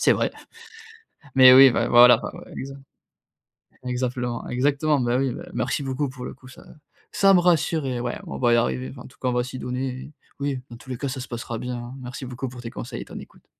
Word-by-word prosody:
c'est - - +5
vrai - - 0 1.1
mais 130 -1 +9
oui, 135 -1 +9
bah, 115 0 0
voilà 120 +1 +7 0.4
exa 135 +1 -6 1.1
exactement, 125 -1 -3
exactement, 140 +3 +1
bah, 120 0 +1
oui, 135 -1 0
bah, - - -9
merci 145 - -1
beaucoup 135 +1 -2
pour 130 -1 -8
le - - -6
coup 130 - -17
ça 130 - -14 0.5
ça 195 -1 +4
me 180 - +6
rassure 165 -3 +2
et 125 -2 -2
ouais 125 +13 -3
on - - -6
va 120 -2 +3
y - - +6
arriver, 125 +2 -1
enfin 130 - -11
en - - -12
tout - - -20
cas 130 - 0
on - - -1
va 125 0 +1
s'y 130 +1 -7
donner 125 +2 -3
et 130 +4 -7 0.3
oui 140 -2 -2
dans 120 - -10
tous 130 - -16
les 125 - -4
cas 140 - -3
ça 130 0 -5
se 130 - -7
passera 120 -1 -5
bien. 120 0 -6
Merci 130 +2 -7
beaucoup 125 +1 -5
pour 125 -1 -10
tes 115 - -6
conseils 120 0 -7
et - - -8
ton - - -9
écoute. - - -15
130 Hz, 235 wpm, -24 LUFS, 125-135 Hz, 1.1 s, mais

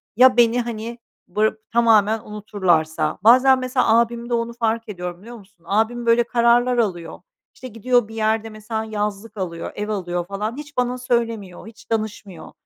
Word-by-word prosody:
Ya, 250 +1 +6
beni 240 +1 +4
hani 235 0 -6 0.3
bır 215 +4 0
tamamen 225 -2 +4
unuturlarsa?" 175 -8 -1
Bazen 260 +4 +6
mesela 255 -3 +2
abimde 235 +1 -2
onu 235 0 -1
fark 230 -1 -2
ediyorum, 180 -2 -6
biliyor 235 +3 -10
musun? 190 -4 -20
Abim 225 +3 0
böyle 230 +1 +4
kararlar 240 +1 +2
alıyor, 185 -8 -2 0.3
işte 255 - -10
gidiyor 245 0 +1
bir 225 - -11
yerde 220 0 0
mesela 220 +1 -5
yazlık 210 0 -4
alıyor, 170 -3 -5
ev 210 +1 -4
alıyor 175 -4 -3
falan, 210 +5 -4
hiç 290 -1 -10
bana 250 0 0
söylemiyor, 230 -7 -2
hiç 225 0 -15
danışmıyor. 215 -5 -4
225 Hz, 155 wpm, -21 LUFS, 205-235 Hz, 0.3 s, Ya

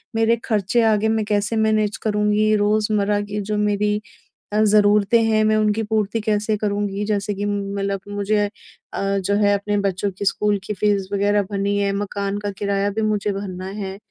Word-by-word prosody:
मेरे 225 +1 +3
खर्चे 215 +2 +1
आगे 215 +1 +1
मैं 220 -1 0
कैसे 210 +2 0
मैनेज 215 -1 +1
करूँगी 210 0 +2
रोज़मर्रा 210 0 +1
की 205 0 -4
जो 210 +1 -2
मेरी 210 0 0 0.5
अ, 215 - +3
ज़रूरतें 210 +1 +4
हैं 215 -1 +2
मैं 215 - +3
उनकी 215 +1 +1
पूर्ति 215 0 -1
कैसे 215 0 0
करूँगी? 205 -1 -2
जैसे 205 -1 -1
कि 205 +1 -3
मतलब 200 -1 -2
मुझे 205 +1 0 0.5
अ, 195 0 -1
जो 200 +2 0
है 205 -1 +3
अपने 205 +1 -1
बच्चों 195 +2 -2
की 195 +2 -6
स्कूल 205 0 +1
की 210 - -3
फीस 200 -1 0
वग़ैरह 205 +1 +2
भरनी 200 0 0
है, 200 -1 +1
मकान 200 0 -3
का 205 -1 -3
किराया 200 0 -1
भी 220 +2 -2
मुझे 210 -1 0
भरना 190 -2 -6 0.2
है। 190 0 -5
205 Hz, 180 wpm, -21 LUFS, 200-215 Hz, 0.5 s, ज़रूरतें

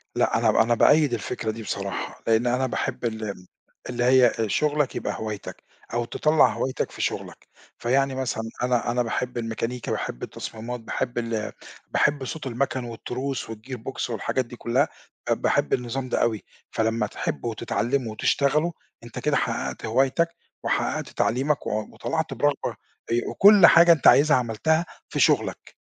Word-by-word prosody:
لأ، - - +2
أنا - - +4
أنا 120 +1 +2
بأيّد 145 +1 +4
الفكرة 110 - -2
دي 110 0 -8
بصراحة، - - -4
لإن 115 +2 +3
أنا 130 +2 +1
باحب 120 - -3
ال 110 -5 -4 0.4
اللي 120 0 -1
هي 125 -2 +6
شُغلَك 150 +5 0
يبقى - - -2
هوايتَك، 110 -2 -6 0.3
أو 120 0 0
تطلَّع 155 +5 +3
هوايتَك 130 - -2
في - - -7
شُغلَك، - - -4 0.3
فيعني 135 +3 +1
مثلًا 130 -4 -2 0.2
أنا 125 -1 +1
أنا 125 +1 +1
باحب 120 +1 -3
الميكانيكا، 115 +1 -3
باحب - - -4
التصميمات، 115 +2 -6
باحب 120 +2 -3
ال 115 -2 -2 0.4
باحب 145 -2 +2
صوت 155 +2 -6
المَكن 130 0 -1
والتروس 125 +3 -4
والGear 115 +4 -7
Box 125 +1 -5
والحاجات 125 +3 -1
دي 120 - -10
كُلّها، 130 +7 +1 0.4
آآ - - +4
باحب 70 - 0
النظام 125 +1 -1
ده - - 0
أوي، 110 -4 0 0.3
فلمّا 110 -1 0
تحبُه 120 - -4
وتتعلمُه 120 +2 -1
وتشتغلُه، 145 +9 +1 0.3
أنت 120 - -8
كده - - +1
حققت - - -2
هوايتَك، 135 +8 +2 0.3
وحققت - - -1
تعليمَك، 135 +5 0
و - - -1 0.2
وطلعت 160 -1 -2
برغبة 145 -1 +2 0.6
آآ 120 - 0
وكُلّ 200 -3 +8
حاجة 170 0 +8
أنت 160 - +1
عايزها 150 +2 +7
عملتها 130 +8 +1 0.2
في - - -3
شُغلَك. - - +1
125 Hz, 155 wpm, -25 LUFS, 115-140 Hz, 0.6 s, وكُلّ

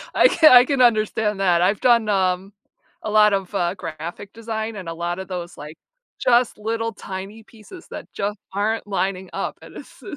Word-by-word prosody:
I - - +6
can 310 -4 +6
I 250 0 +9
can 275 -2 0
understand 215 -3 +2
that. 175 -3 +3
I've 195 +3 +2
done, 235 -3 +3
um, 190 0 0 0.5
a 215 - -3
lot 210 -1 +5
of 195 0 -2
uh, 175 -2 0
graphic 170 +3 -8
design 225 0 -5
and 185 -4 -7
a - - -4
lot 175 +2 -4
of 190 - -7
those, 175 -2 -6
like, 150 +2 -10 0.4
just 240 0 +2
little 225 +1 -2
tiny 195 +3 -8
pieces 230 - -15
that - - -9
just 205 +1 -3 0.2
aren't 210 +2 -1
lining 190 -1 -2
up - - -3
and - - -12
it - - -7
s - - -19
205 Hz, 195 wpm, -22 LUFS, 185-225 Hz, 0.5 s, I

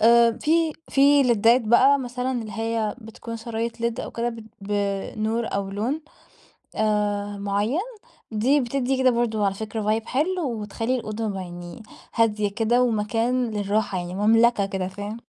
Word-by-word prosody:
آآ، 235 0 +5
في 325 0 +2 0.2
في 280 +1 +5
ليدات 235 0 +4
بقى 255 +5 +5
مثلًا 250 0 -3
اللي 215 - -8
هي 225 -1 -1
بتكون 230 0 -8
شرايط 230 0 -4
led 235 0 -2
أو - - -6
كده، 235 +1 -2
بت 230 -2 -7 0.2
بنور 205 +3 -2
أو 195 -1 -2
لون 230 +10 -2 0.8
آآ، 205 -1 0
معيّن، 205 - 0 0.5
دي 250 +7 +2
بتدّي 260 +1 -1
كده 260 -1 +4
برضو 230 -3 0
على 195 0 +1
فكرة 220 +1 -4 0.2
vibe 225 - -11
حلو، 315 +2 0
وتخلّي 225 +4 -2
الأوضة 215 -4 -3
يعني 175 +2 -8 0.3
هادية 210 -2 +2
كده 235 +4 +2
ومكان 230 +2 0
للراحة، 205 -2 -1
يعني 175 +1 -5
مملكة 220 0 +4
كده 190 -1 -3
فاهم؟ 205 +3 -6
225 Hz, 150 wpm, -24 LUFS, 205-240 Hz, 0.8 s, آآ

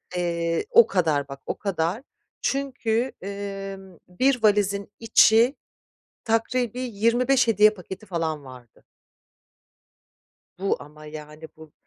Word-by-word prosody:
eee, 170 -1 -1
o 470 0 +7
kadar 155 -6 +1
bak, 140 -1 -9
o - - -3
kadar. 190 +3 -2 0.4
Çünkü, 255 -3 -1
eee, 195 0 -6 0.3
1 245 +6 +1
valizin 200 -1 +2
içi 230 +3 +5 0.7
takribî 235 +1 0
25 245 +2 +2
hediye 215 0 +6
paketi 190 +1 -10
falan 160 -5 -3
vardı. 125 -3 -15 1.7
Bu 195 +1 0
ama 150 +1 -13
yani 150 +1 -10
bu. 160 -1 -14
200 Hz, 105 wpm, -24 LUFS, 165-230 Hz, 1.7 s, o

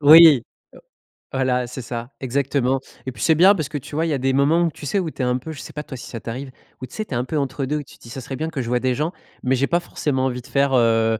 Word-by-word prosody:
Oui, 155 -2 +9 0.9
voilà, 125 -2 +1
c'est 125 +2 -6
ça, 120 +2 -6
exactement, 135 0 +1 0.3
et 130 - -3
puis, 105 - -10
c'est 160 - +5
bien 185 +5 +7
parce 155 -6 -2
que 150 - -3
tu 145 +1 -8
vois, 160 +2 +1
il - - 0
y - - +1
a - - +1
des 135 +1 +1
moments 145 +5 +4
où 165 - +1
tu 145 - -10
sais, 195 +8 +1
où 165 -4 -2
tu - - -6
es - - +2
un 125 0 +1
peu, 160 +5 -7
je 145 - -10
sais - - -10
pas, 150 +1 -4
toi, 130 - -8
si - - -9
ça 115 - -6
t'arrive, 130 +4 -6 0.3
où, - - -3
tu - - -13
sais, 215 - -2
tu - - -25
es - - 0
un 125 - -1
peu 150 +4 -2
entre 135 0 -1
2. 150 +2 -2
Tu - - -17
te - - -22
dis: 115 - -11
«Ça 135 - -6
serait 135 +2 -6
bien 160 +2 -2
que 140 -5 -3
je 120 - -4
vois 125 - +2
des 130 -1 +1
gens, 155 +5 -1 0.3
mais 130 +1 +2
j'ai 140 +2 +1
pas 175 +3 +2
forcément 130 -6 -1
envie 125 -1 -2
de - - -16
faire, 140 -1 +2
heu, 115 -2 +3
135 Hz, 325 wpm, -22 LUFS, 125-150 Hz, 0.9 s, Oui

